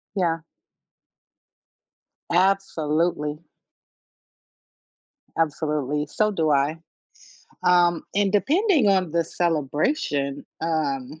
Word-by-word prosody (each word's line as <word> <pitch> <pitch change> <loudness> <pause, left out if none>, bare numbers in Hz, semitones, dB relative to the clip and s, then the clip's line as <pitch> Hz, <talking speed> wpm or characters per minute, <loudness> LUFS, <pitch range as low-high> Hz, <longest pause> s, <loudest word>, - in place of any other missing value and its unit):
Yeah. 170 -3 +1 1.9
Absolutely. 165 -5 +1 2.0
Absolutely, 150 -2 -1
so 215 +8 0
do 160 -6 +1
I, 145 +3 +1 0.9
um, 175 -1 +3
and 200 0 +2
depending 305 - +3
on 190 -4 +2
the 170 0 +2
celebration, 150 - -1 0.2
um, 150 -3 -2
165 Hz, 70 wpm, -24 LUFS, 150-190 Hz, 2.0 s, um